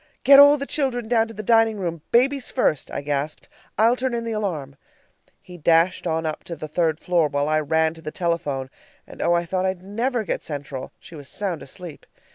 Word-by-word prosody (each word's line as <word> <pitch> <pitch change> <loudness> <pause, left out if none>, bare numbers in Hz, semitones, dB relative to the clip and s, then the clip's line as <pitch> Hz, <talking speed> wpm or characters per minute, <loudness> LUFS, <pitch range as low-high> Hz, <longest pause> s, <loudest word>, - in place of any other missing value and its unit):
"Get 275 +1 +8
all 285 +1 +8
the 280 - -4
children 260 -6 -1
down 225 -1 +2
to 225 - -10
the 215 - -6
dining 225 0 +3
room, 170 -4 -4
babies 265 +2 +2
first," 155 - 0
I - - -4
gasped. 145 +1 -3 0.3
"I'll 225 +4 +4
turn 255 -1 -2
in 235 - -2
the 230 - -4
alarm." 170 -11 -3 0.7
He 180 -1 -12
dashed 165 +3 +2
on 160 0 -1
up 155 -1 -4
to 170 - -6
the 155 0 -7
third 160 0 0
floor 175 -3 +2
while 145 0 -1
I 155 0 +2
ran 160 +1 +1
to 165 - -14
the 155 - -5
telephone 150 -6 -2 0.3
and - - -11
oh, 175 - +2
I 170 0 +1
thought 185 +2 -1
I'd 185 -1 -3
never 230 +4 -1
get - - -3
Central! 140 -3 -6
She - - -15
was 145 -3 -8
sound 190 -6 -2
asleep. 170 +2 -10
175 Hz, 215 wpm, -23 LUFS, 155-225 Hz, 0.7 s, Get